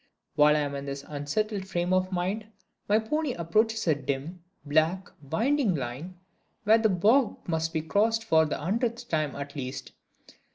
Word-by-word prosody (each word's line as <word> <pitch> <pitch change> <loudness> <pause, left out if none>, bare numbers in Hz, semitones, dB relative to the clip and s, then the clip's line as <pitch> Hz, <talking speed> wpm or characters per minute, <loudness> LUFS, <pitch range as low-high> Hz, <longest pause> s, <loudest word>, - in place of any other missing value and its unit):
While 150 0 +5
I 150 - +2
am 145 -1 -2
in 140 0 -5
this 140 0 -5
unsettled 190 +8 -2
frame 175 0 -1
of 185 0 +1
mind, 190 +4 -2 0.4
my 210 - +5
pony 275 +5 -1
approaches 215 +6 +1
a 160 - +4
dim, 145 +5 -4 0.2
black, 160 +6 +1
winding 220 - +1
line, 140 +7 -5 0.5
where 220 +2 +5
the 220 -1 +3
bog 215 +7 +3
must 160 -1 -1
be 160 -2 -2
crossed 220 +7 +1
for 160 -7 +4
the - - -2
hundredth 235 - -2
time 155 -4 0
at 140 +1 -7
least. 130 -1 -5
175 Hz, 165 wpm, -28 LUFS, 150-215 Hz, 0.5 s, While